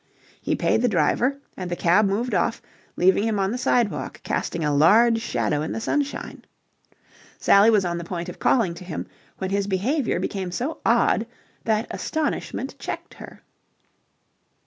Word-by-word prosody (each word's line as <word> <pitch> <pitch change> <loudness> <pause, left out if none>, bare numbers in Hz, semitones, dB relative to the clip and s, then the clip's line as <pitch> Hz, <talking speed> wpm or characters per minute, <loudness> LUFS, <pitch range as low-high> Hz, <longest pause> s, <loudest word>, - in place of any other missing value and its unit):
He - - 0
paid - - +1
the 250 - +3
driver, 250 +7 +1 0.2
and 185 -2 -5
the 175 - -2
cab 180 +5 +3
moved 220 +5 -1
off, 190 +5 +1 0.4
leaving 190 +2 +3
him 220 -2 0
on 195 0 0
the 245 - -2
sidewalk 240 -3 0
casting 165 -3 -2
a 150 - +1
large 225 +11 +5
shadow 150 -9 -1
in 155 - -3
the - - -3
sunshine. 285 +5 -3 0.9
Sally 200 +3 +5
was 210 -4 +3
on 170 -1 -2
the - - -5
point 170 0 -5
of 180 - -8
calling 220 -9 +2
to 170 - -10
him, 175 -3 -5 0.3
when 190 0 -4
his 200 0 0
behaviour 230 - 0
became 190 -2 -3
so 255 - -3
odd - - +2 0.4
that 220 0 +1
astonishment 315 -1 -3
checked - - -6
her. - - -12
200 Hz, 165 wpm, -24 LUFS, 180-235 Hz, 0.9 s, large